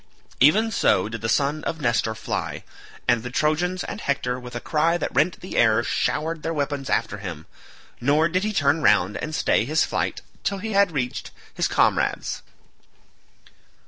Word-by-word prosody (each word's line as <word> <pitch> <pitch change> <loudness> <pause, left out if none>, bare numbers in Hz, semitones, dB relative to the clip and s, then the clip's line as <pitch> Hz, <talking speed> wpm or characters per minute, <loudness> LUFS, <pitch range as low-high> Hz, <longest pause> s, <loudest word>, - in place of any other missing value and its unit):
Even 215 - +5
so 95 - +2
did 115 0 -6
the 115 - -2
son 145 +5 +1
of 160 - -3
Nestor 120 -4 0
fly, 110 - -4 0.4
and 120 -2 +3
the 125 - -6
Trojans 160 +7 0
and 205 - -6
Hector 125 -3 -1
with 125 -1 -10
a - - -2
cry 160 +6 +1
that - - -3
rent 150 +7 +2
the 185 - -7
air 115 0 +4
showered 160 +5 -1
their 165 +1 -3
weapons 140 -2 -2
after 115 -2 0
him; 85 -6 -7 0.5
nor 145 +6 +3
did 185 +3 0
he 215 - 0
turn 155 -5 +2
round 95 -7 +3
and 155 0 -4
stay - - +2
his 155 +7 +2
flight - - -2 0.2
till 200 - -1
he 220 +3 -5
had 200 -2 +4
reached 125 -5 -3 0.2
his - - 0
comrades. - - +1
145 Hz, 175 wpm, -24 LUFS, 120-165 Hz, 0.5 s, Even